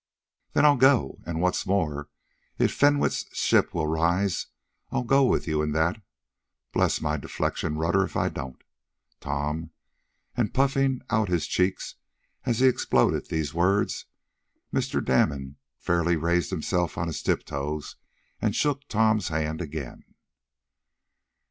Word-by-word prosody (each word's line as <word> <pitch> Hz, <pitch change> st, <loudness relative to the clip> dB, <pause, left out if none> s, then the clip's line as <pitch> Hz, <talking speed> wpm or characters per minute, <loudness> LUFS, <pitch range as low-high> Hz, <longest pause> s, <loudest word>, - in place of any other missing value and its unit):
"Then -, -, +4 dB
I'll 145 Hz, -2 st, +6 dB
go, 130 Hz, -, +3 dB
and, 85 Hz, -1 st, -2 dB
what's 90 Hz, +2 st, 0 dB
more, 75 Hz, -7 st, -1 dB, 0.5 s
if -, -, +2 dB
Fenwick's 145 Hz, 0 st, +2 dB
ship -, -, +2 dB
will 80 Hz, -2 st, -1 dB
rise, 85 Hz, +5 st, +1 dB, 0.4 s
I'll -, -, -1 dB
go 135 Hz, +3 st, +4 dB
with -, -, +1 dB
you 75 Hz, -1 st, +1 dB
in 75 Hz, -1 st, -1 dB
that 85 Hz, +7 st, +1 dB, 0.7 s
bless -, -, +2 dB
my 75 Hz, -1 st, 0 dB
deflection 75 Hz, +2 st, -2 dB
rudder 85 Hz, +5 st, +2 dB
if -, -, -4 dB
I -, -, +1 dB
don't, 65 Hz, -2 st, -7 dB, 0.6 s
Tom!" 75 Hz, +3 st, -3 dB, 0.7 s
and 120 Hz, -4 st, -1 dB
puffing 135 Hz, -1 st, +2 dB
up 110 Hz, -2 st, +2 dB
his 85 Hz, -4 st, 0 dB
cheeks, 90 Hz, +1 st, -1 dB, 0.5 s
as 120 Hz, 0 st, 0 dB
he 130 Hz, -, +7 dB
exploded 65 Hz, -, +2 dB
these 80 Hz, -1 st, -2 dB
words, 95 Hz, +5 st, +1 dB, 0.7 s
Mr. -, -, -1 dB
Damon 65 Hz, +1 st, +1 dB, 0.2 s
fairly 85 Hz, +2 st, +1 dB
raised 85 Hz, +2 st, +1 dB
himself 90 Hz, -1 st, -1 dB
on -, -, -1 dB
his 80 Hz, -3 st, -4 dB
tiptoes, 75 Hz, +2 st, -2 dB, 0.5 s
and -, -, 0 dB
shook 145 Hz, -1 st, 0 dB
Tom's 110 Hz, -3 st, +2 dB
hand 80 Hz, 0 st, -2 dB
again. 75 Hz, -5 st, -6 dB
85 Hz, 135 wpm, -26 LUFS, 75-110 Hz, 0.7 s, he